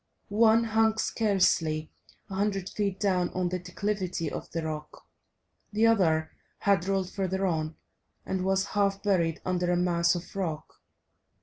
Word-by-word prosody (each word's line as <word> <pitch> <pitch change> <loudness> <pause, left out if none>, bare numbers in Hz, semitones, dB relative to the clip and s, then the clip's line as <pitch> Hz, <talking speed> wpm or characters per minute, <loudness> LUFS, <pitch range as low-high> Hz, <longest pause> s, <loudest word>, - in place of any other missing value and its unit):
One 220 +2 +5
hung 220 0 +2
scarcely 180 -9 +1 0.4
a 195 - -9
hundred 195 -1 -1
feet 200 -3 -2
down 185 -3 +1
on 180 -1 0
the 180 +1 -2
declivity 180 -2 -3
of - - -6
the 165 -1 -3
rock, 155 -1 -6 0.7
the 215 +2 +2
other 165 -8 +3 0.3
had 195 -3 +2
rolled 195 -2 0
further 190 0 -1
on, 160 -3 -1 0.5
and 190 -1 -2
was 190 0 +1
half 200 -1 +1
buried 170 -6 +1
under 180 -1 0
a 175 - +2
mass 170 -1 +2
of 175 +2 -7
rock. 165 -6 -4
185 Hz, 145 wpm, -28 LUFS, 170-200 Hz, 0.7 s, One